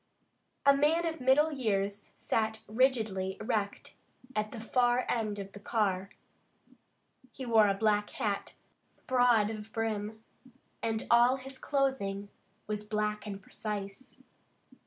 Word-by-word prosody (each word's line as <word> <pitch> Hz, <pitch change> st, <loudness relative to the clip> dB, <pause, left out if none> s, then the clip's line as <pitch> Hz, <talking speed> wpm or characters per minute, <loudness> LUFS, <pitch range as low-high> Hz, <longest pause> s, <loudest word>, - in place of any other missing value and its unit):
A 280 Hz, 0 st, +7 dB
man 310 Hz, +4 st, +3 dB
of 325 Hz, -3 st, -3 dB
middle 280 Hz, +5 st, +4 dB
years 205 Hz, -6 st, -1 dB
sat 220 Hz, 0 st, -1 dB
rigidly 215 Hz, -5 st, +1 dB
erect 215 Hz, -3 st, -2 dB, 0.4 s
at 215 Hz, 0 st, 0 dB
the 230 Hz, -, -8 dB
far 245 Hz, +2 st, +2 dB
end 215 Hz, -3 st, -1 dB
of 195 Hz, -1 st, -6 dB
the 205 Hz, -, -11 dB
car. 200 Hz, -3 st, 0 dB, 1.2 s
He 265 Hz, -, -7 dB
wore 225 Hz, -3 st, +5 dB
a 195 Hz, -, +2 dB
black 210 Hz, 0 st, +2 dB
hat, 210 Hz, -6 st, -3 dB, 0.5 s
broad 245 Hz, -4 st, +4 dB
of 215 Hz, 0 st, -8 dB
brim, 220 Hz, -1 st, -3 dB, 0.6 s
and 225 Hz, -1 st, -1 dB
all 240 Hz, +2 st, +6 dB
his 265 Hz, 0 st, -9 dB
clothing 225 Hz, -9 st, -1 dB, 0.4 s
was 210 Hz, 0 st, -3 dB
black 210 Hz, 0 st, -2 dB
and 200 Hz, -1 st, -5 dB
precise. 200 Hz, +3 st, -6 dB
220 Hz, 125 wpm, -31 LUFS, 205-250 Hz, 1.2 s, A